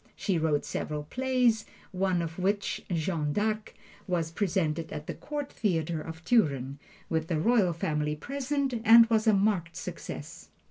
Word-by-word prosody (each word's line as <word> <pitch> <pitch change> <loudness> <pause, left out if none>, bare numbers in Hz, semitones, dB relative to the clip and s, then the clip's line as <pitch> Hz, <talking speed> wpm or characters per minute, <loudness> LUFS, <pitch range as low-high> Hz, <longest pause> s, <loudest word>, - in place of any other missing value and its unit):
She 190 -5 0
wrote 155 -2 +1
several 150 -1 -3
plays, 250 - +1 0.3
one 185 -2 0
of 165 +2 -6
which, 200 +2 -1
"Jeanne 160 -3 -1
d'Arc," 215 +2 -1 0.3
was 170 -3 -1
presented 165 -4 -1
at 150 - -6
the - - -4
Court 290 -1 -5
Theater 165 -6 -1
of 160 +1 -9
Turin, 140 - +2 0.3
with 160 -1 -1
the 165 -3 0
Royal 210 0 +3
Family 150 -2 -1
present, 275 - -2
and 230 +1 +9
was 220 0 +3
a 220 - +6
marked 195 -4 +1
success. - - -7
180 Hz, 150 wpm, -29 LUFS, 160-220 Hz, 0.3 s, and